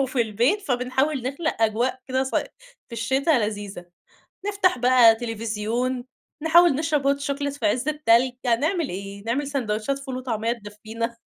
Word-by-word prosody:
وفي 255 -2 0
البيت، 235 - +1
فبنحاول 265 -1 0
نخلق 280 -1 -2
أجواء 235 +4 +1
كده 260 +1 +1
صي 265 - -1 0.4
في - - -20
الشتا 265 +7 0
لذيذة، 205 - -1 0.6
نفتَح 390 -8 +2
بقى 245 -2 +6
تليفزيون، 230 +2 -3 0.4
نحاول 335 -1 +6
نشرب 290 -2 +1
hot - - -12
chocolate 285 0 -3
في 220 - -2
عِز 245 +7 +1
التلج، 260 -5 +3
يعني 235 -2 +1
نعمل 330 0 0
إيه؟ 200 +2 -7
نعمل 265 +5 -1
ساندويتشات 255 -1 -2
فول 265 -2 -6
وطعمية 230 -3 -2
تدفينا، 225 +2 -6
250 Hz, 150 wpm, -24 LUFS, 225-280 Hz, 0.6 s, بقى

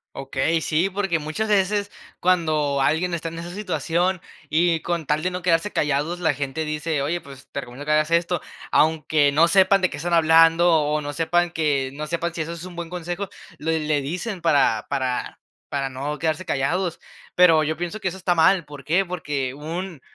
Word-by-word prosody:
Okey, 140 +4 -1
sí, 165 +6 +1
porque 190 -4 -1
muchas 155 +9 -3
veces 205 0 +1 0.3
cuando 155 -6 +1
alguien 165 +6 +1
está 165 -1 -3
en 165 - -9
esa 170 +1 -7
situación, 180 -1 -1 0.3
y 165 +1 +2
con 170 -3 -2
tal 150 +2 0
de 180 - 0
no 180 0 -5
quedarse 180 +4 +2
callados, 150 +4 0
la 160 -4 +2
gente 140 +3 -3
dice: 155 0 -2
"Oye, 170 +4 -1
pues 135 -2 -13
te 140 - -3
recomiendo 130 +3 -9
que 150 - -1
hagas 155 +1 +3
esto", 170 +1 +1 0.3
aunque 155 -2 +3
no 165 +4 +4
sepan 190 +2 +4
de 185 - +2
qué - - -6
están 175 +3 -3
hablando, 165 +1 +5
o, 150 -1 +2
no 145 0 -5
sepan 170 +2 +1
que 145 -5 0
no 150 +1 -5
sepan 170 +1 -2
si 170 - -3
eso 165 +2 -4
es 170 0 -8
un 180 -1 -10
buen 170 -1 -6
consejo, 175 +3 -4 0.3
le 160 +1 0
le 150 -1 0
dicen 180 +7 -4
para 140 -9 +2
para 130 -3 -2 0.3
para 135 -1 -2
no 140 +3 -4
quedarse 160 +3 -1
callados. 170 +4 -1 0.4
Pero 165 -3 +6
yo 155 0 -2
pienso 175 +5 -4
que 190 - -3
eso 185 - -3
está 180 -1 +1
mal, 175 +1 +4
¿por 145 -2 -11
qué? 180 +5 +2
Porque 145 -7 -3
un 165 +2 -6
165 Hz, 200 wpm, -23 LUFS, 150-175 Hz, 0.4 s, Pero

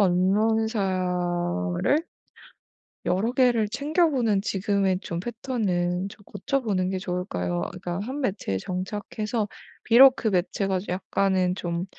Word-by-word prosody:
언론사를 185 - +1 1.0
여러 205 +7 +1
개를 245 -4 +3
챙겨보는 280 - +1
지금의 195 -2 0
좀 170 0 -4
패턴은 195 -6 -1
좀 205 0 -15
고쳐보는 205 -3 -1
게 190 0 -2
좋을까요? 90 - -2
그러니까 180 0 -5
1 260 +8 -4
매체에 190 - -1
정착해서 210 - -3 0.4
비록 255 +2 +8
그 225 - -1
매체가 190 0 0
좀 185 - -8
약간은 185 -1 +1
좀 175 -1 -3
195 Hz, 255 characters per minute, -25 LUFS, 180-225 Hz, 1.0 s, 비록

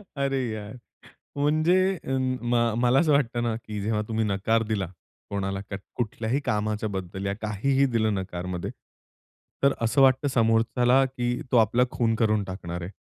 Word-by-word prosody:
अरे 135 -1 0
यार! 105 -1 -6 0.6
म्हणजे 155 +5 +3 0.3
अं, 130 -1 0
म 120 0 0 0.3
मला 125 +2 +4
असं 155 -3 +3
वाटतं 120 -4 +1
ना, 120 -1 0
की 110 -2 -6
जेव्हा 105 +1 0
तुम्ही 110 0 0
नकार 105 +3 +1
दिला 100 -3 0 0.4
कोणाला. 95 -1 -2
क - - -4 0.2
कुठल्याही 115 +3 -1
कामाच्याबद्दल, 105 -4 -2
या 100 - -1
काहीही 130 +6 +1
दिलं 110 -2 +2
नकारमध्ये. 90 -2 -4 0.9
तर 140 0 +5
असं 115 +5 +2
वाटतं 135 +2 +4
समोरच्याला, 120 +3 +3
की 125 -2 -2
तो - - +5
आपला 115 +2 +4
खून 115 -3 +1
करून 110 -2 +2
टाकणार 90 -2 -6
आहे. 85 - -5
115 Hz, 150 wpm, -26 LUFS, 105-130 Hz, 0.9 s, तर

